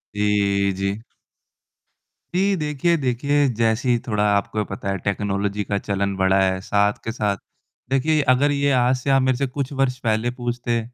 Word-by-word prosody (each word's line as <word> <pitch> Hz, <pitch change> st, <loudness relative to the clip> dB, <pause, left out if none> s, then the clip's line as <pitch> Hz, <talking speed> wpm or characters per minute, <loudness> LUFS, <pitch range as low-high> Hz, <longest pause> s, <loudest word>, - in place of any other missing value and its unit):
जी, 100 Hz, -1 st, +1 dB
जी। 100 Hz, +3 st, -3 dB, 1.3 s
जी, 195 Hz, +1 st, +2 dB
देखिए, 155 Hz, +1 st, 0 dB
देखिए 140 Hz, +2 st, +1 dB
जैसे 115 Hz, +3 st, 0 dB
ही 120 Hz, -, +4 dB
थोड़ा 105 Hz, -2 st, 0 dB
आपको 100 Hz, +1 st, -1 dB
भी -, -, +1 dB
पता 100 Hz, 0 st, -5 dB
है 95 Hz, -, -1 dB
टेक्नोलॉजी 100 Hz, 0 st, -1 dB
का 100 Hz, 0 st, -2 dB
चलन 100 Hz, -1 st, -2 dB
बढ़ा 95 Hz, 0 st, +3 dB
है, 95 Hz, -1 st, +1 dB
साथ 100 Hz, +1 st, +2 dB
के 115 Hz, -, -3 dB
साथ 105 Hz, -3 st, -1 dB, 0.5 s
देखिए 150 Hz, +4 st, +2 dB
अगर 145 Hz, +3 st, +2 dB
ये 140 Hz, 0 st, +1 dB
आज 125 Hz, 0 st, +3 dB
से 130 Hz, -, -4 dB
आप 135 Hz, 0 st, +4 dB
मेरे 130 Hz, -1 st, +1 dB
से 140 Hz, 0 st, 0 dB
कुछ 135 Hz, +1 st, -4 dB
वर्ष 130 Hz, -2 st, +1 dB
पहले 110 Hz, +1 st, +1 dB
पूछते, 120 Hz, -1 st, -2 dB
115 Hz, 175 wpm, -22 LUFS, 100-135 Hz, 1.3 s, ही